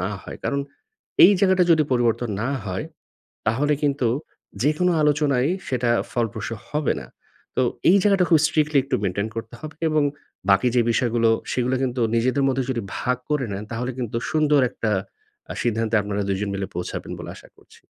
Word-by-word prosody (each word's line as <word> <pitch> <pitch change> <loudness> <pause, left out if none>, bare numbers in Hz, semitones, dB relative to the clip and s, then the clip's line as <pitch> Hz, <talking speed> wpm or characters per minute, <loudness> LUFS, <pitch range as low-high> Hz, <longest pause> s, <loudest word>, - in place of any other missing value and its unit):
না 90 - -1
হয়। - - -9
কারণ 140 0 0 0.6
এই 200 - +8
জায়গাটা 190 -2 +4
যদি 160 -2 +6
পরিবর্তন 120 -1 +1
না 125 - -1 0.2
হয়, - - -3 0.6
তাহলে 145 +7 +2
কিন্তু 140 -3 +1 0.6
যেকোনো 155 +5 +2
আলোচনায় 145 -2 +2 0.2
সেটা 125 -3 0 0.2
ফলপ্রসূ 115 -2 -2 0.2
হবে 150 -2 0
না। - - -10 0.5
তো - - +2 0.3
এই 195 - +7
জায়গাটা 195 -3 +4
খুব 160 - +6
স্ট্রিক্টলি 155 -1 +1
একটু 135 -2 -1
মেইনটেইন 100 +2 -1
করতে 115 0 -6
হবে 155 0 -8
এবং 155 -1 +2 0.5
বাকি 95 +5 +4
যে 120 - +5
বিষয়গুলো 115 -1 +2 0.2
সেগুলা 125 +1 0
কিন্তু 125 -1 -1
নিজেদের 130 +4 +2
মধ্যে 130 0 +1
যদি 120 -3 -1 0.2
ভাগ 125 0 0
করে 150 -4 +1
নেন 100 +1 -4
তাহলে 125 +2 -2
কিন্তু 115 -2 -3
সুন্দর 150 -2 +3
একটা 115 -3 -2 0.6
আ - - -3
সিদ্ধান্তে 115 -1 0
আপনারা 100 0 -2
২ 95 -1 0
জন 105 - -1
মিলে 95 -1 -3
পৌঁছাবেন 90 0 -5
বলে - - -7
আশা - - -15
করছি। - - -21
125 Hz, 175 wpm, -23 LUFS, 115-150 Hz, 0.6 s, এই